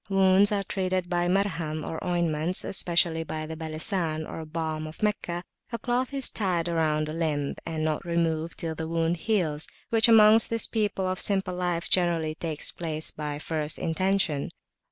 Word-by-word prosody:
Wounds 195 +1 +5
are 200 -1 0
treated 185 -2 -2
by 175 0 +1
Marham, 165 -5 -1
or 160 - -5
ointments, 175 -1 +1
especially 170 -3 +1
by 155 -1 -5
the 160 +1 -6
"Balesan," 160 0 -3
or 160 - -6
Balm 155 -1 -3
of 155 +7 -10
Meccah; 180 -4 -1 0.3
a 235 - -2
cloth 245 +2 -1
is 275 -2 +2
tied 180 -5 -1
round 155 -2 +1
the 155 - -5
limb, 150 -4 -1
and 155 -1 -2
[p.390]not 155 -1 -1
removed 170 -1 -1
till 165 -1 -3
the 160 0 -5
wound 165 +1 0
heals, 165 -7 0 0.2
which 225 0 +5
amongst 220 0 +7
this 230 -1 +4
people 205 -4 -1
of 185 0 -2
simple 190 -2 +2
life, 175 -2 -2
generally 170 -3 +1
takes 155 -1 -3
place 160 -2 -4
by 150 -1 -4
first 155 0 -2
intention. 180 -3 0
170 Hz, 170 wpm, -27 LUFS, 155-190 Hz, 0.3 s, amongst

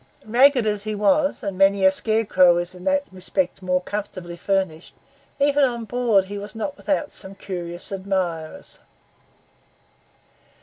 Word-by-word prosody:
Ragged 250 +2 +4
as 210 -1 -1
he 215 0 -2
was, 280 +8 +2
and 195 -1 -4
many 195 0 +4
a 190 - +7
scarecrow 190 -4 +3
is 175 +1 -3
in 180 0 -12
that 285 0 +2
respect 185 0 -2
more 180 0 0
comfortably 185 -3 -6
furnished, 180 -3 -2 0.4
even 285 0 +3
on 240 -3 0
board 230 -5 +2
he 200 +1 -6
was 205 +2 -9
not 280 +6 -4
without 290 -1 -2
some 190 +1 -8
curious 175 -2 -6
admirers. 185 -5 -3
195 Hz, 140 wpm, -23 LUFS, 185-230 Hz, 0.4 s, a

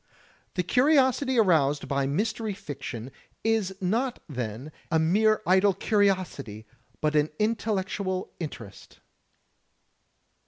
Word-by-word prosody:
The 180 - +1
curiosity 260 - +3
aroused 155 -9 +3
by 140 -1 0
Mystery 215 +7 -1
Fiction 135 - -7 0.3
is 220 -4 +1
not 230 +7 0
then, 125 +1 -5 0.2
a 160 - +2
mere 215 +7 +3
idle 190 +2 +4
curiosity 185 - 0 0.4
but 155 0 +1
an 150 0 +3
intellectual 200 -4 -1
interest. 120 - -8
185 Hz, 95 wpm, -27 LUFS, 145-220 Hz, 0.4 s, idle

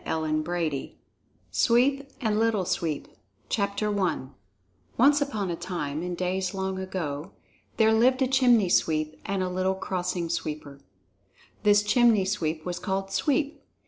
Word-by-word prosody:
CHAPTER 155 -1 -1 0.2
VII 155 -5 -3 0.5
SWEEP 275 +4 +2
AND 215 -3 +1
LITTLE 220 -4 +1
SWEEP 160 -4 -2 0.5
I 200 -3 0 0.8
Once 285 +4 +5
upon 215 -10 -1
a - - -2
time, 155 -4 -4
in 180 0 -3
days 185 +1 -2
long 190 0 -2
ago, 175 -4 -4 0.4
there 220 -1 +5
lived 255 +4 +4
a - - +2
Chimney 245 -7 +4
Sweep 155 -2 +1
and 195 -1 0
a - - -1
little 185 +1 0
Crossing 180 -2 -2
Sweeper. 150 -4 -4 0.8
This 205 0 +4
Chimney 220 -2 +4
Sweep 165 -5 -2
was 180 -1 -3
called 195 -1 -2
"Sweep." 285 +7 0
190 Hz, 135 wpm, -27 LUFS, 170-220 Hz, 0.8 s, Once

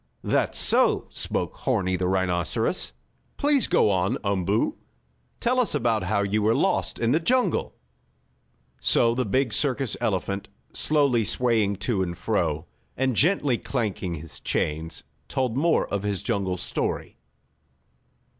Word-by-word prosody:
"That's - - 0
so," - - +4
spoke - - -2
Horni, 95 0 0
the 90 0 -1
rhinoceros. 95 - 0 0.5
"Please 285 -2 +2
go 105 - +3
on, 95 0 +1
Umboo. 100 -4 0 0.6
Tell 250 +2 +1
us 245 - +1
about 115 -2 +1
how 100 +2 0
you 105 +2 0
were 110 +2 +3
lost - - 0
in 115 0 +1
the 155 - +3
jungle." 250 +9 +1 1.0
So 115 - +3
the 125 +1 -1
big 130 +1 +1
circus 135 -1 0
elephant, 100 -1 -1 0.3
slowly 140 -6 +2
swaying 110 -2 +1
to 105 -5 +1
and 85 -2 -3
fro, 85 -8 -1 0.3
and 130 -2 +1
gently 145 - +2
clanking 100 -8 -2
his 80 0 -9
chains, 80 +2 -2 0.2
told 130 -4 -1
more 165 +5 +2
of 100 - 0
his 100 -2 -2
jungle 100 -5 -1
story. 90 - -3
110 Hz, 135 wpm, -25 LUFS, 95-130 Hz, 1.0 s, so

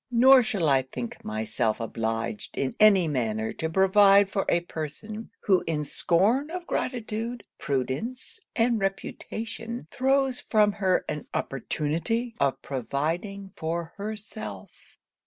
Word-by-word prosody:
Nor 255 +2 +7
shall 200 -8 0
I 135 -2 +4
think 125 -2 -7
myself 110 0 -1
obliged 115 -1 -3
in 135 - -1
any 200 -5 +6
manner 110 -6 -1
to 160 - -3
provide 195 +2 +5
for 195 - 0
a 170 - +3
person, 175 +7 -6
who 190 -3 +3
in 155 -2 0
scorn 205 - +2
of 355 +1 -5
gratitude, 235 -4 -3 0.2
prudence 145 - -3 0.2
and 235 -1 +2
reputation, 225 +3 -4
throws 265 0 +2
from 210 -2 +3
her 195 -2 +1
an 150 -1 -4
opportunity 165 - -1
of 140 -1 0
providing 165 - -3
for 165 +1 -3
herself.' 215 +1 -7
195 Hz, 120 wpm, -27 LUFS, 140-225 Hz, 0.2 s, Nor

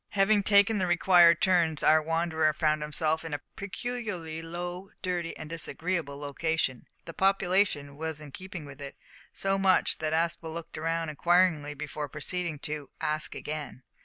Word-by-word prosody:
Having 205 +1 +4
taken 205 +2 +5
the 185 - +1
required 175 -1 +5
turns 170 -4 +3
our 155 0 +6
wanderer 160 -1 +1
found 155 0 +1
himself 155 +1 0
in 160 -3 -3
a 145 - -6
peculiarly 200 -6 -4
low, 175 +3 -6
dirty, 175 -2 -2
and 155 - -7
disagreeable 165 -2 -3
locality. 145 -2 -1 0.2
The 165 - -8
population 190 -7 +1
was 160 0 -4
in 150 -2 -10
keeping 180 0 -8
with 140 0 -11
it 140 -1 -8 0.3
so 195 0 0
much 190 -1 +3
so - - -2
that 155 -1 -1
Aspel 165 0 0
looked 165 -1 -7
round 165 0 -1
inquiringly 165 -2 +2
before 150 0 -5
proceeding 165 +2 -3
to 150 -2 -5
"ask 155 -1 -1
again." 150 -4 -6
165 Hz, 160 wpm, -28 LUFS, 155-180 Hz, 0.3 s, our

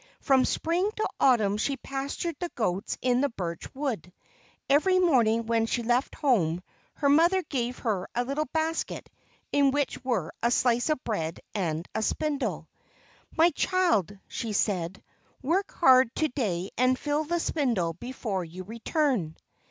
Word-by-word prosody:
From 265 -2 +3
Spring 350 +5 0
to 435 - -1
Autumn 215 -6 +4
she 275 +5 -1
pastured 275 +5 -4
the 350 - -3
goats 200 -3 -1
in 250 0 +3
the 285 - +2
birch 170 -6 -5
wood. 245 - -3 0.6
Every 310 +7 +4
morning 235 -10 +3
when 225 0 +1
she 240 +1 -1
left 245 +3 +1
home, 180 - +1 0.3
her 285 - 0
mother 340 +6 +4
gave 250 -4 -3
her 205 -6 -2
a 245 - +1
little 285 +4 -2
basket 320 +3 -2 0.4
in 280 -1 +4
which 280 -2 -1
were 230 -11 -1
a 235 - +3
slice 245 +2 +2
of 305 -4 0
bread 165 -7 -3
and 170 -4 -2
a 220 - -1
spindle. 225 - -1 0.7
"My 335 +2 +6
child," 285 - +1
she 225 -2 -4
said, 190 -3 -1 0.4
"work 360 +9 0
hard 260 -6 +5
to 310 -1 +1
day 195 -8 -2
and 255 0 +3
fill 295 +2 -1
the 345 +3 -1
spindle 235 - 0
before 205 -1 -4
you 175 +3 -8
return." 230 - -1
250 Hz, 150 wpm, -27 LUFS, 205-290 Hz, 0.7 s, My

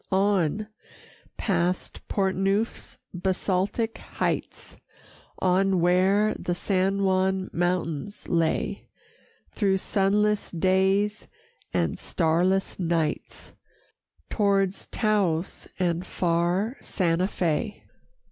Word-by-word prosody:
On, 195 0 +1 0.7
past 180 -3 -1
Portneuf's 195 +2 -1 0.2
basaltic 190 +4 -1
heights, - - -3 0.6
On 190 0 +2
where 190 +5 +3
the 175 - -2
San 195 +2 0
Juan 190 0 +1
mountains 175 +1 -2
lay, 165 -2 0 0.6
Through 195 -3 +1
sunless 205 +2 +1
days 190 +4 +1 0.4
and - - 0
starless 180 +4 +1
nights, 165 -3 -2 0.8
Towards 200 -2 +1
Taos 195 -6 0
and 175 -1 0
far 180 +7 0
Sante 175 -1 0
Fé. 190 +3 -2
190 Hz, 80 wpm, -26 LUFS, 175-200 Hz, 0.8 s, where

